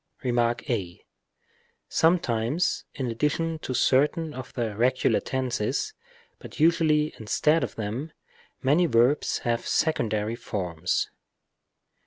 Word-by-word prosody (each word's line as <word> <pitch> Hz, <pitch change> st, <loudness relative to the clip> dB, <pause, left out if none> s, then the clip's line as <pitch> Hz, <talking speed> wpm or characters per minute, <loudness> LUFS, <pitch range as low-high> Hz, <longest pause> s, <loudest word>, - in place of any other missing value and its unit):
Rem. 120 Hz, -2 st, +1 dB
a. 115 Hz, -6 st, -1 dB, 0.8 s
Sometimes 160 Hz, -2 st, +1 dB
in 135 Hz, -, -3 dB
addition 155 Hz, +6 st, -1 dB
to 130 Hz, -, -4 dB
certain 150 Hz, +6 st, +2 dB
of 130 Hz, -2 st, -8 dB
the 115 Hz, -4 st, -2 dB
regular 125 Hz, +3 st, +2 dB
tenses, 130 Hz, -, -2 dB, 0.5 s
but -, -, -11 dB
usually 155 Hz, -2 st, +3 dB
instead 150 Hz, +9 st, +2 dB
of -, -, -4 dB
them, 115 Hz, +9 st, -4 dB, 0.5 s
many 155 Hz, +7 st, +4 dB
verbs 125 Hz, +2 st, +3 dB
have 120 Hz, -1 st, 0 dB
secondary 110 Hz, -8 st, 0 dB
forms. 90 Hz, -7 st, -2 dB
130 Hz, 105 wpm, -26 LUFS, 115-155 Hz, 0.8 s, many